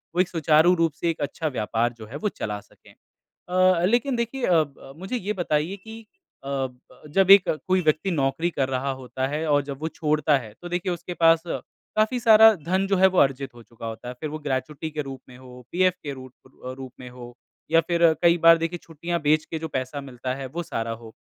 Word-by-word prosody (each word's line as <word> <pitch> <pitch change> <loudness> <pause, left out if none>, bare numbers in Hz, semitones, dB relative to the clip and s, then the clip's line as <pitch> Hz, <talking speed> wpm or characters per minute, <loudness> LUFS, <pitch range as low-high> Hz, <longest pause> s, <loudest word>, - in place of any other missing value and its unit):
वो 180 - +4
एक 185 - 0
सुचारू 160 +1 +4
रूप 165 -3 +1
से 170 +1 -2
एक 165 - -3
अच्छा 155 +2 -3
व्यापार 115 -2 -1
जो 110 - -9
है 120 +6 -11
वो - - +3
चला 105 - -5
सकें। 100 - -21 0.6
अ, 185 -1 +3
लेकिन 245 +4 +1
देखिए 235 +2 -3
अ, 165 -3 +4
ब 135 -1 -15
मुझे 190 +7 -4
ये 210 -1 -2
बताइए 175 0 -1
कि 220 +3 -11 0.4
अ, 135 -1 -1 0.4
जब 195 +5 +2
एक 195 -2 +8 0.2
कोई 185 0 +3
व्यक्ति 155 +5 +1
नौकरी 155 +2 0
कर 135 -4 -1
रहा 135 +1 -1
होता 130 0 -4
है 150 +3 -3
और 145 -1 +3
जब 140 -1 -6
वो 160 - -2
छोड़ता 150 -2 +1
है 110 -4 -10
तो 175 - -6
देखिए 180 +1 -2
उसके 175 +1 -6
पास 165 -1 +4
काफ़ी 215 +7 -2
सारा 220 -1 +8
धन 185 +4 -1
जो 195 -1 +1
है 190 +1 +6
वो - - +1
अर्जित 135 -2 +1
हो 120 - -13
चुका 115 0 -11
होता 115 +2 -7
है। 125 - -6
फिर 155 - -3
वो 155 - -5
ग्रेच्युटी 150 +2 -3
के 150 0 -3
रूप 135 -1 -8
में 125 - -13
हो, 125 -1 -13
पीएफ 185 +1 +3
के 145 -2 -4
रूट 130 -1 -10 0.3
अ, 130 - -5
रूप 130 -1 -9
में 125 - -8
हो 120 -1 -11 0.4
या 165 0 +5
फिर 170 +1 -1 0.2
कई 170 0 +5
बार 165 0 +7
देखिए 165 +2 -3
छुट्टियाँ 170 +2 -4
बेच 155 +1 +3
के 160 - -5
जो 160 0 -5
पैसा 130 +1 -4
मिलता 130 -1 -5
है 135 -1 -6
वो 175 - -2
सारा 115 -7 -4
हो। 115 0 -8
155 Hz, 230 wpm, -24 LUFS, 130-175 Hz, 0.6 s, एक